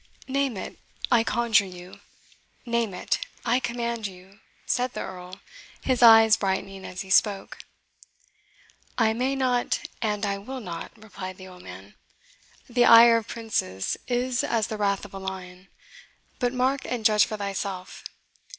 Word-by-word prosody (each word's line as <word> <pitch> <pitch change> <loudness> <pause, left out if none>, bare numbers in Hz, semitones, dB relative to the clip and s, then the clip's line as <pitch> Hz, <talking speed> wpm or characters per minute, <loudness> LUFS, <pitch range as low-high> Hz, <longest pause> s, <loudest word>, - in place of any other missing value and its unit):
"Name 275 -4 -1
it, - - -7 0.3
I 235 -2 +5
conjure 230 -2 +2
you 180 0 -11 0.7
name 235 -3 0
it, - - -1 0.3
I 245 +2 +3
command 235 -3 -3
you!" 190 +2 -15 0.3
said 250 0 0
the - - -4
Earl, 185 +1 -8 0.4
his 255 -2 0
eyes 225 -2 +8
brightening 195 0 -3
as 185 - -6
he 190 - -9
spoke. 200 -1 +2 1.4
"I 220 -2 +3
may 255 +4 -1
not, 255 -2 0 0.2
and 210 -1 -1
I 200 0 -2
will 260 +6 -7
not," 175 -7 -7
replied 200 -4 -8
the 185 - -11
old 180 -1 -13
man. 95 +2 -11 0.7
"The 245 0 +3
ire 230 0 +8
of 230 -1 -4
princes 150 - -2
is 245 0 0
as 225 -2 0
the 215 - -4
wrath 200 -1 0
of 200 - -12
the 195 - -7
lion. 190 -1 -7 0.7
But 245 -1 +1
mark, 260 +2 0
and 235 -3 -4
judge 210 -1 +5
for 215 - -5
thyself. 195 -2 -5
215 Hz, 150 wpm, -25 LUFS, 190-240 Hz, 1.4 s, eyes